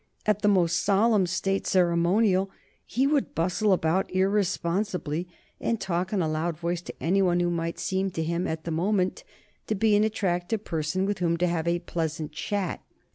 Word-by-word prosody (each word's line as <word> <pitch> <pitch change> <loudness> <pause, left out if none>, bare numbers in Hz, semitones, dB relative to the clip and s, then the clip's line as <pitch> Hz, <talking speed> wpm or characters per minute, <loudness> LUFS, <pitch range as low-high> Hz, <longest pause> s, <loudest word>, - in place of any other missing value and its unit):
At 210 -1 +1
the 210 - +2
most 175 -4 +3
solemn 205 -1 +3
State 195 +2 -1
ceremonial 185 +3 +3 0.4
he 260 +4 +1
would 285 -1 +1
bustle 185 +5 +1
about 180 +1 +1
irresponsibly, 185 -3 0 0.3
and 230 -1 -1
talk 180 0 -2
in 195 -4 +1
a - - 0
loud 155 +1 -1
voice 170 +1 -2
to - - -9
any 190 +4 +2
one 175 -2 +2
who 175 0 +1
might 170 0 -2
seem 190 +1 -1
to 160 - -2
him 170 +3 -1
at 160 0 -4
the 170 - -4
moment 185 +3 0 0.4
to 215 - 0
be 210 +1 +3
an 205 - +4
attractive 200 -1 -1
person 160 +4 -1
with 205 -1 -2
whom 170 -1 +1
to 180 - +1
have 170 -1 -1
a 170 0 +2
pleasant 160 -3 -3
chat. 195 +4 -3
180 Hz, 185 wpm, -26 LUFS, 170-200 Hz, 0.4 s, an